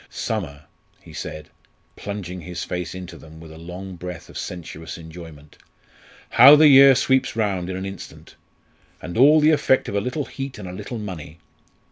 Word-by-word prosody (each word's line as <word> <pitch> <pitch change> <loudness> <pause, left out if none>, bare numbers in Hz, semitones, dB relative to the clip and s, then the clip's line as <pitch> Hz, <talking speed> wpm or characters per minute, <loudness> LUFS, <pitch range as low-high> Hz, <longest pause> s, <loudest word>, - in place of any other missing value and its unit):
"Summer!" 80 -10 -5 0.4
he - - -16
said, 75 -1 -8 0.4
plunging 90 -3 -7
his 90 +2 -6
face 90 -1 -5
into 90 -2 -9
them 80 0 -14
with 80 -1 -12
a 80 - -12
long 90 +2 -9
breath 90 0 -8
of - - -10
sensuous 80 -2 -8
enjoyment. 80 -3 -13 0.7
"How 135 +5 +9
the 155 +1 +6
year 135 -1 +8
sweeps 130 -1 +1
round 100 -5 -1
in 95 - -4
an 95 - -5
instant! 95 0 -10 0.7
And 85 +2 -8
all 145 +6 +6
the 155 +1 +4
effect 130 -3 +2
of - - -5
a 100 - +1
little 125 +6 -3
heat 135 -1 -7
and 100 -3 -8
a 90 - -7
little 120 +6 -7
money. 85 -7 -8
90 Hz, 175 wpm, -22 LUFS, 85-120 Hz, 0.7 s, How